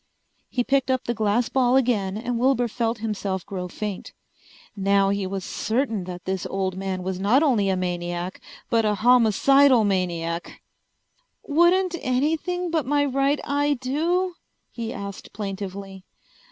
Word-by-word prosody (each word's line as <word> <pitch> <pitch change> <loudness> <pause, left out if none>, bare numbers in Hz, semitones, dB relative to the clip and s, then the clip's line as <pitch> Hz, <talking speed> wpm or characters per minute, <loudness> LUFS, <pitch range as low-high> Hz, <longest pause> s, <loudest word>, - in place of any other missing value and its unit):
He 245 - 0
picked 270 +1 +1
up 260 -1 +1
the 240 - -1
glass 220 +1 +1
ball 255 -1 +2
again 215 -7 +1
and 240 +1 -2
Wilbur 250 -1 +2
felt 230 0 -1
himself 195 -4 -3
grow 185 -2 -5
faint. 205 +1 -6 0.6
Now 195 0 +2
he 200 -1 -1
was 190 -1 -4
certain 225 -4 -1
that 180 -1 -8
this 190 -1 -2
old 190 -1 -2
man 190 -1 -3
was 185 0 -3
not 225 +10 +3
only 225 -10 +2
a 190 - +1
maniac 175 0 -3 0.3
but 230 -1 +3
a 210 -1 +1
homicidal 245 +3 +5
maniac! 175 -4 -2 0.8
"Wouldn't 345 +4 +3
anything 320 +7 -1
but 315 -6 0
my 290 0 +2
right 275 +1 +1
eye 290 0 +1
do?" 335 +8 0 0.4
he 230 -1 -5
asked 200 -1 -7
plaintively. 195 -1 -6
220 Hz, 145 wpm, -24 LUFS, 190-270 Hz, 0.8 s, homicidal